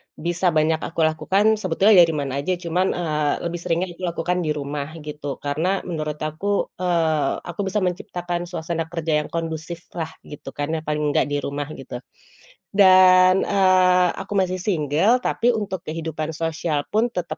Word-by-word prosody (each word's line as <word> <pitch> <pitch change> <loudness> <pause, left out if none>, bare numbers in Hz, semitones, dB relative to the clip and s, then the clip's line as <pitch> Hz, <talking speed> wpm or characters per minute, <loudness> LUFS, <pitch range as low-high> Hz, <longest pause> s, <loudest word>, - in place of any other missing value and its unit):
bisa 175 +3 -1
banyak 160 -1 +2
aku 165 - -6
lakukan, 180 +6 +1
sebetulnya 190 +2 +4
dari 165 -2 +5
mana 140 -2 -2
aja. 180 +6 -1
Cuman, 180 +1 -1
eee, 150 -4 0
lebih 170 0 -3
seringnya 170 +2 -1
dilakukan 175 0 -1
di 160 -3 -1
rumah, 145 0 -4 0.2
gitu. 150 -2 -5
Karena, 165 +7 -1
menurut 155 -4 -3
aku, 180 +7 -1
eee, 160 -5 +1
aku 175 +3 -5
bisa 195 0 0
menciptakan 175 -1 -3
suasana 165 -1 -3
kerja 165 -2 -1
yang 150 - -4
kondusiflah 165 0 -5 0.2
gitu 140 -2 -10
kan, 145 +2 -3
yang 160 -1 -4
paling 150 0 -1
enggak - - +2
di 145 - -2
rumah 145 0 -3
gitu. 125 -2 -8 0.7
Dan, 185 -1 +6
eee, 185 -2 +4
aku - - -7
masih 185 0 -1
single, 180 - +1
tapi 245 +1 +1
untuk 200 -5 -4
kehidupan 160 0 -4
sosial 160 -1 -2
pun 230 +3 +1
tetap 180 -2 -4
165 Hz, 160 wpm, -22 LUFS, 155-185 Hz, 0.7 s, Dan